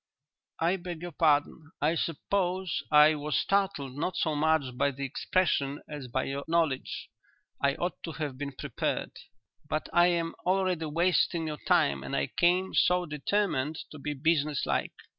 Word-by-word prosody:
'" - - -56
"I 170 +4 +2
beg 175 -2 -7
your 175 - -5
pardon. 155 0 +1
I 150 +3 +2
suppose 180 +2 -1
I 150 0 +7
was 150 -3 -1
startled 195 -10 0
not 165 +6 -2
so 155 - +1
much 150 -4 +1
by 140 +3 +2
the 140 0 -5
expression 145 -1 0
as 145 -4 -7
by 130 +2 -1
your 140 +1 -3
knowledge. 160 -5 -1 0.5
I 140 0 +2
ought 175 +1 -3
to 165 - -5
have 150 -4 -4
been 140 +1 -5
prepared. - - -3 0.6
But 155 - -2
I 175 0 +6
am 170 -2 0
already 185 -3 +1
wasting 170 +1 +2
your 150 -2 -4
time 70 -1 +3
and 70 - -4
I 70 0 -1
came 180 +2 +2
so 180 0 +3
determined 155 -1 -1
to 155 - -9
be 150 +1 -3
business 150 0 +1
like. - - -1
155 Hz, 165 wpm, -29 LUFS, 140-175 Hz, 0.6 s, I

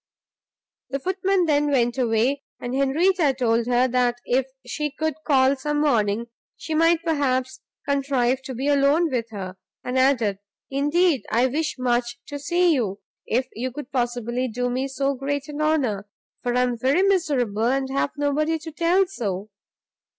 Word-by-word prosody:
The 275 - -1
footman 375 +2 +1
then 295 -2 +2
went 245 -2 +1
away; 245 +3 +1 0.2
and 245 - -5
Henrietta 290 +3 +2
told 235 -2 +1
her, 250 +1 +3
that 245 -1 +1
if 255 +1 +1 0.2
she 295 +4 -2
could 315 +2 -2
call 270 -1 +4
some 295 +2 -2
morning 230 -6 +1 0.3
she 320 - -5
might 330 +1 +3
perhaps 260 -5 0 0.3
contrive 270 -2 +1
to 260 - -5
be 265 +4 -2
alone 290 +3 +3
with 235 -2 -2
her, 190 -4 -7 0.3
and 250 +1 -1
added, 240 -7 +2 0.3
"indeed 295 +2 +2
I 235 +3 +3
wish 300 +5 -1
much 240 -1 0
to 285 -1 -5
see 345 +4 +2
you, 210 -8 -1 0.3
if 250 +3 0
you 255 +3 -3
could 290 +1 -8
possibly 245 0 -1
do 245 +1 -2
me 260 +2 -1
so 275 +1 -1
great 280 +2 -3
an 300 0 -5
honour; 255 -11 0 0.3
for 245 0 -1
I 250 - +3
am 245 -2 -1
very 275 +10 +3
miserable, 280 - +1
and 265 +2 +1
have 275 +1 0
nobody 300 +3 +1
to 320 +1 -9
tell 345 +5 +2
so! 215 - -4
265 Hz, 165 wpm, -23 LUFS, 245-295 Hz, 0.3 s, call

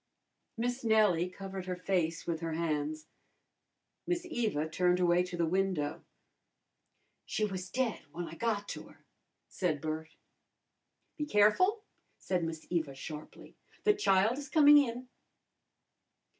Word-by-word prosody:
Miss 245 +2 -2
Nellie 210 -6 +3
covered 190 0 -7
her 180 - -2
face 180 -3 -1
with 165 -2 -2
her 165 -1 -3
hands. 155 -1 -2 1.0
Miss 355 0 -1
Eva 220 - -1
turned 180 +2 +2
away 175 0 +4
to 180 -1 -4
the 170 - +2
window. 180 -4 -1 1.2
"She 215 - 0
was 185 -2 -5
dead 250 -2 -1
w'en 170 +4 -6
I 160 - -9
got 205 +1 -1
to - - -6
her," - - -20 0.4
said 165 -6 -1
Bert. 155 +2 -5 1.0
"Be 300 -1 -2
careful!" 335 - +4 0.3
said 180 -2 -1
Miss 165 -1 -4
Eva 160 -6 -1
sharply. 150 +3 -9 0.3
"The 420 - +5
child 230 - +2
is 285 -1 -8
coming 295 -1 +8
in." 250 -2 -2
185 Hz, 130 wpm, -32 LUFS, 165-230 Hz, 1.2 s, coming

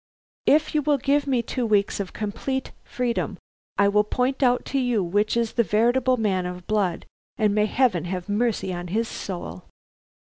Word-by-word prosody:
If 310 +1 +4
you 305 - +2
will 290 0 +2
give 280 +2 +1
me 255 -4 +1
two 250 +2 -3
weeks 205 -3 +1
of 195 -2 -4
complete 260 +5 -3
freedom, 235 -5 -2 0.4
I 200 - +4
will 210 +1 +4
point 255 +5 -1
out 250 -2 +3
to 275 - +2
you 245 -6 +1
which 205 +6 +1
is 230 -1 0
the 235 - +3
veritable 245 +4 +2
man 190 -5 0
of 180 0 -7
blood, 200 -5 0 0.3
and 215 -2 +2
may 210 0 +2
Heaven 215 -8 +1
have 180 0 -4
mercy 210 -2 0
on 175 0 -5
his 225 +6 -1
soul!" 130 - -6
215 Hz, 180 wpm, -24 LUFS, 195-250 Hz, 0.4 s, If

